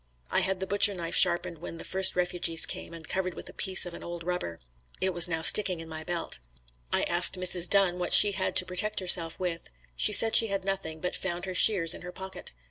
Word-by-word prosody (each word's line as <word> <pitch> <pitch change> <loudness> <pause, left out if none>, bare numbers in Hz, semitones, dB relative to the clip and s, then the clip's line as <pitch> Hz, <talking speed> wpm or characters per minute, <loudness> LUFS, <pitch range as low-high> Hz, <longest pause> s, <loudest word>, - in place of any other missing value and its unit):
I - - 0
had 190 -1 -3
the 190 - -5
butcher 200 +1 +2
knife 170 -2 -7
sharpened 170 -2 +2
when 165 0 -10
the - - -9
first 190 0 +1
refugees 175 -2 -1
came - - -7
and 165 -2 -13
covered 185 -2 -5
with - - -10
a - - -15
piece 190 -2 -2
of 175 - -10
an - - -12
old 170 0 -9
rubber. 175 - -6 0.4
It 190 0 -2
was 175 0 +4
now 165 -2 -5
sticking 185 -1 +4
in 165 - -10
my 160 0 -9
belt. 170 - -6 0.5
I - - 0
asked 175 +2 +3
Mrs. 180 -1 +3
Dunn 190 -3 +1
what 175 - -5
she 205 - +9
had 190 -1 -4
to 185 - +3
protect 210 +4 -1
herself 170 -3 +1
with. 175 -2 -6 0.3
She 60 - +4
said 225 -1 +5
she 225 - +6
had 195 -2 -5
nothing, 160 -5 -6
but 180 - -5
found 175 -1 -5
her 185 - -7
shears 180 -3 +2
in - - -12
her 180 - -10
pocket. 190 - -10
180 Hz, 235 wpm, -26 LUFS, 170-190 Hz, 0.5 s, she